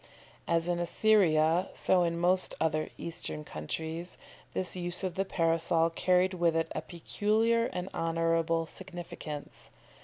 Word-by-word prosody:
As 165 Hz, 0 st, +1 dB
in 175 Hz, -1 st, 0 dB
Assyria, 175 Hz, -3 st, +3 dB
so 185 Hz, -, +3 dB
in 170 Hz, -1 st, 0 dB
most 180 Hz, +2 st, +2 dB
other 155 Hz, -1 st, 0 dB
Eastern 165 Hz, -2 st, -1 dB
countries, 160 Hz, -, -5 dB, 0.4 s
this 185 Hz, -1 st, +2 dB
use 175 Hz, +1 st, -4 dB
of 185 Hz, -2 st, -2 dB
the 195 Hz, +3 st, -1 dB
Parasol 165 Hz, -1 st, +2 dB
carried 185 Hz, +2 st, +2 dB
with 170 Hz, -2 st, +1 dB
it 165 Hz, 0 st, 0 dB
a -, -, -3 dB
peculiar 220 Hz, +6 st, 0 dB
and 180 Hz, +1 st, -5 dB
honourable 165 Hz, 0 st, 0 dB
significance. 170 Hz, -4 st, -7 dB
170 Hz, 130 wpm, -30 LUFS, 165-185 Hz, 0.4 s, Assyria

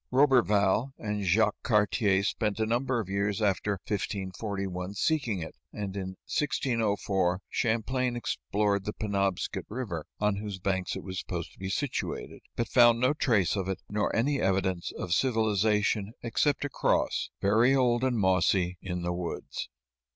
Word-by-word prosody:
Roberval 125 Hz, -3 st, +3 dB
and 105 Hz, -2 st, -3 dB
Jacques 105 Hz, +3 st, +2 dB
Cartier 105 Hz, -3 st, +2 dB
spent 105 Hz, +1 st, -1 dB
a 110 Hz, -, +2 dB
number 120 Hz, +2 st, 0 dB
of 110 Hz, -, -3 dB
years 100 Hz, +2 st, -1 dB
after 105 Hz, 0 st, +1 dB
1541 95 Hz, -1 st, -3 dB
seeking 120 Hz, -, 0 dB
it, 80 Hz, -, -8 dB, 0.2 s
and 100 Hz, -2 st, -5 dB
in 95 Hz, -1 st, -4 dB
1604 105 Hz, -10 st, 0 dB
Champlain 120 Hz, +2 st, 0 dB
explored 100 Hz, -, -1 dB
the 105 Hz, -, -2 dB
Penobscot 100 Hz, -3 st, -1 dB
River, 105 Hz, -10 st, -4 dB
on 105 Hz, -1 st, +1 dB
whose 100 Hz, -2 st, -5 dB
banks 95 Hz, 0 st, -1 dB
it -, -, -6 dB
was 95 Hz, 0 st, -5 dB
supposed 85 Hz, -3 st, -5 dB
to -, -, -22 dB
be 95 Hz, 0 st, -4 dB
situated, 140 Hz, +6 st, -3 dB
but 120 Hz, -, -1 dB
found 120 Hz, -1 st, +6 dB
no 130 Hz, +4 st, +3 dB
trace 115 Hz, -, +2 dB
of 95 Hz, -2 st, -2 dB
it, 95 Hz, -, -4 dB
nor 105 Hz, 0 st, 0 dB
any 140 Hz, +4 st, +1 dB
evidence 95 Hz, -2 st, 0 dB
of 85 Hz, -, -2 dB
civilization 105 Hz, -2 st, +1 dB
except 145 Hz, +5 st, +1 dB
a -, -, -2 dB
cross, -, -, 0 dB
very 115 Hz, +7 st, +4 dB
old 125 Hz, -2 st, +2 dB
and 130 Hz, -2 st, +1 dB
mossy, 90 Hz, -2 st, +2 dB
in 90 Hz, -2 st, -4 dB
the 90 Hz, 0 st, -1 dB
woods. 85 Hz, -1 st, -5 dB
105 Hz, 150 wpm, -29 LUFS, 95-115 Hz, 0.2 s, found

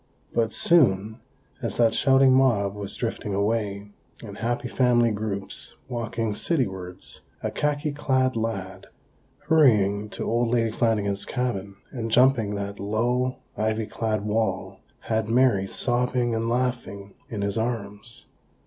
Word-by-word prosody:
But 115 Hz, -2 st, +1 dB
soon, 110 Hz, -, +3 dB, 0.4 s
as -, -, -3 dB
that 115 Hz, -2 st, +4 dB
shouting 135 Hz, +1 st, +5 dB
mob 115 Hz, -7 st, +3 dB
was 100 Hz, -1 st, -6 dB
drifting 110 Hz, -4 st, -3 dB
away, 100 Hz, -1 st, -1 dB, 0.3 s
and 100 Hz, -2 st, -9 dB
happy 120 Hz, +3 st, -1 dB
family 120 Hz, -2 st, +3 dB
groups 105 Hz, -2 st, -4 dB
walking 115 Hz, -2 st, -2 dB
citywards, 95 Hz, -, -3 dB, 0.2 s
a -, -, -1 dB
khaki 150 Hz, 0 st, -1 dB
clad 130 Hz, -3 st, +1 dB
lad, 95 Hz, -5 st, -4 dB, 0.6 s
hurrying 105 Hz, -, +4 dB
to -, -, -5 dB
old 120 Hz, +1 st, +1 dB
Lady 115 Hz, -1 st, +1 dB
Flanagan's 105 Hz, -3 st, 0 dB
cabin, 105 Hz, -6 st, -3 dB, 0.2 s
and 115 Hz, -4 st, -4 dB
jumping 115 Hz, -3 st, +3 dB
that 100 Hz, 0 st, -5 dB
low, 120 Hz, +5 st, 0 dB, 0.2 s
ivy 110 Hz, 0 st, 0 dB
clad 110 Hz, 0 st, -2 dB
wall, 110 Hz, +1 st, -1 dB, 0.2 s
had 110 Hz, -1 st, -1 dB
Mary, 115 Hz, -5 st, +3 dB
sobbing 125 Hz, +1 st, 0 dB
and 115 Hz, 0 st, -1 dB
laughing, 120 Hz, -5 st, -2 dB, 0.2 s
in 105 Hz, -3 st, -3 dB
his 100 Hz, +2 st, -1 dB
arms. 110 Hz, -1 st, -4 dB
115 Hz, 130 wpm, -25 LUFS, 100-125 Hz, 0.6 s, shouting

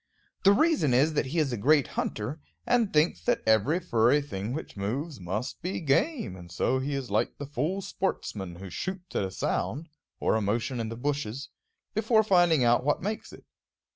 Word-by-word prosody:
The 195 Hz, -, +7 dB
reason 205 Hz, -, +3 dB
is 150 Hz, +5 st, +3 dB
that 145 Hz, -, 0 dB
he 155 Hz, +6 st, -4 dB
is 145 Hz, -5 st, +1 dB
a -, -, -1 dB
great 145 Hz, +5 st, +3 dB
hunter, 125 Hz, +9 st, -3 dB, 0.2 s
and 240 Hz, -4 st, +2 dB
thinks 150 Hz, -, +2 dB
that -, -, 0 dB
every 110 Hz, -, +3 dB
furry 125 Hz, -5 st, +3 dB
thing 110 Hz, -7 st, -5 dB
which 150 Hz, -, -5 dB
moves 130 Hz, +9 st, -3 dB
must 95 Hz, +7 st, -4 dB
be 180 Hz, +3 st, -3 dB
game; 160 Hz, -, +1 dB
and 85 Hz, -2 st, -12 dB
so 130 Hz, +8 st, +1 dB
he 140 Hz, +2 st, -2 dB
is 130 Hz, -5 st, -4 dB
like 105 Hz, -, 0 dB
the 145 Hz, -, -5 dB
fool 150 Hz, +8 st, -2 dB
sportsman 95 Hz, -, -3 dB
who 95 Hz, +1 st, -9 dB
shoots 185 Hz, -, -5 dB
at -, -, +1 dB
a 95 Hz, -, -2 dB
sound, 125 Hz, -, -2 dB, 0.3 s
or -, -, +2 dB
a 110 Hz, -, +1 dB
motion 115 Hz, +5 st, -1 dB
in 115 Hz, -1 st, -2 dB
the 115 Hz, -, -5 dB
bushes, 140 Hz, -1 st, -3 dB, 0.4 s
before 220 Hz, +1 st, +3 dB
finding 175 Hz, -8 st, +4 dB
out 120 Hz, +1 st, +4 dB
what 145 Hz, +4 st, 0 dB
makes 210 Hz, +2 st, -4 dB
it. -, -, -14 dB
140 Hz, 195 wpm, -28 LUFS, 110-170 Hz, 0.4 s, The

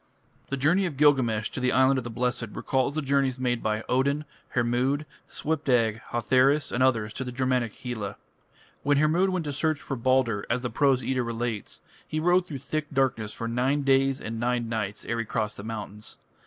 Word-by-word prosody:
The 140 Hz, -, -1 dB
journey 175 Hz, +8 st, +3 dB
of 150 Hz, -6 st, -6 dB
Gilgamesh 130 Hz, -7 st, +3 dB
to -, -, -5 dB
the 125 Hz, 0 st, +1 dB
Island 130 Hz, +1 st, +4 dB
of -, -, -6 dB
the 120 Hz, -, -6 dB
Blessed 125 Hz, 0 st, -1 dB
recalls 135 Hz, +2 st, 0 dB
the 155 Hz, -, -1 dB
journeys 135 Hz, -2 st, +1 dB
made 125 Hz, -2 st, 0 dB
by 110 Hz, +1 st, -1 dB
Odin, 140 Hz, +4 st, +1 dB, 0.3 s
Hermod, 125 Hz, +5 st, +1 dB, 0.2 s
Svipdag, 125 Hz, -8 st, 0 dB
Hotherus 130 Hz, +5 st, +2 dB
and 120 Hz, -, -1 dB
others 115 Hz, -5 st, +2 dB
to 130 Hz, -, -4 dB
the 125 Hz, -, -5 dB
Germanic 125 Hz, -3 st, 0 dB
Hela. 110 Hz, -5 st, -5 dB, 0.7 s
When 145 Hz, 0 st, +2 dB
Hermod 160 Hz, +6 st, +3 dB
went 185 Hz, -3 st, -1 dB
to 145 Hz, -, -3 dB
search 155 Hz, +1 st, 0 dB
for 135 Hz, -, -4 dB
Balder, 120 Hz, -4 st, +1 dB
as 120 Hz, +1 st, 0 dB
the 125 Hz, -2 st, -3 dB
Prose 135 Hz, +1 st, +2 dB
Edda 130 Hz, +1 st, 0 dB
relates, 115 Hz, -2 st, -4 dB, 0.3 s
he 155 Hz, -, -2 dB
rode 175 Hz, +2 st, +3 dB
through 145 Hz, -, -5 dB
thick 150 Hz, +3 st, -3 dB
darkness 130 Hz, -6 st, 0 dB
for 115 Hz, -, -5 dB
nine 130 Hz, +5 st, +1 dB
days 135 Hz, 0 st, +3 dB
and 115 Hz, +1 st, -5 dB
nine 120 Hz, 0 st, 0 dB
nights 105 Hz, -3 st, -3 dB
ere 115 Hz, 0 st, -2 dB
he 115 Hz, -, -1 dB
crossed 110 Hz, -1 st, -2 dB
the 100 Hz, -, -7 dB
mountains. 105 Hz, -1 st, -7 dB
130 Hz, 195 wpm, -27 LUFS, 115-140 Hz, 0.7 s, Island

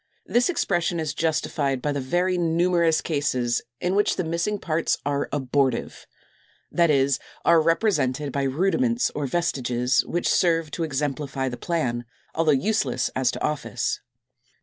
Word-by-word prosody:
This 240 Hz, +5 st, +2 dB
expression 175 Hz, -, 0 dB
is 155 Hz, -2 st, -2 dB
justified 150 Hz, -3 st, 0 dB
by 145 Hz, +3 st, -1 dB
the 140 Hz, -1 st, -2 dB
very 175 Hz, +7 st, +1 dB
numerous 170 Hz, -1 st, +2 dB
cases 130 Hz, -6 st, 0 dB, 0.2 s
in 180 Hz, +1 st, 0 dB
which 205 Hz, +1 st, +2 dB
the 185 Hz, -, -1 dB
missing 170 Hz, +6 st, -1 dB
parts 165 Hz, -3 st, 0 dB
are 140 Hz, 0 st, -1 dB
abortive, 135 Hz, -2 st, -1 dB, 0.6 s
that 170 Hz, -1 st, +3 dB
is, 140 Hz, -2 st, +3 dB, 0.3 s
are 170 Hz, -1 st, +6 dB
represented 155 Hz, -, +1 dB
by 140 Hz, -, -1 dB
rudiments 195 Hz, -, +1 dB
or 145 Hz, -2 st, -3 dB
vestiges, 125 Hz, -6 st, +1 dB
which 175 Hz, -, -1 dB
serve 165 Hz, -3 st, +2 dB
to 170 Hz, -, -3 dB
exemplify 140 Hz, -2 st, -2 dB
the 125 Hz, -, -5 dB
plan, 120 Hz, -6 st, -2 dB, 0.3 s
although 160 Hz, -1 st, +2 dB
useless 145 Hz, -, +1 dB
as 130 Hz, -2 st, +2 dB
to -, -, -5 dB
office. 150 Hz, -2 st, -1 dB
155 Hz, 145 wpm, -24 LUFS, 135-175 Hz, 0.6 s, are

